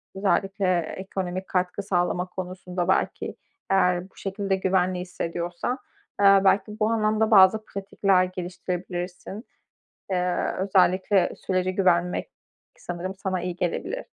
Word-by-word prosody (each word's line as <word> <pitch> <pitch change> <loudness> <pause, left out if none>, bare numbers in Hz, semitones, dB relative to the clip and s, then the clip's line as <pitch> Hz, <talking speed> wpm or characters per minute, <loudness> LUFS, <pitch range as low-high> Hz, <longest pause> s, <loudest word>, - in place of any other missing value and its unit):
özellikle 195 -1 +1
ekonomik 185 +2 -4
katkı 185 +2 -1
sağlama 180 -2 0
konusunda 180 -1 -5
belki - - 0 0.3
eğer 180 -1 +2
bu - - -32
şekilde 195 0 -2
güvenli 185 -1 +1
hissediyorsan. 175 +5 -3 0.4
Eee, 195 -1 +7
belki 205 +2 +2
bu 215 0 +2
anlamda 220 0 +1
bazı 210 +1 +6
pratikler 195 -2 +1
geliştirebilirsin. 180 +2 -5 0.7
Eee, 180 -1 0
özellikle 185 0 +3
sürece 185 0 -1
güvenmek 180 -2 +1 0.5
k - - -26
sanırım 180 +2 -5
sana 190 -1 -2
iyi 180 -1 -3
gelebilir. 185 - -3
185 Hz, 115 wpm, -25 LUFS, 180-195 Hz, 0.7 s, Eee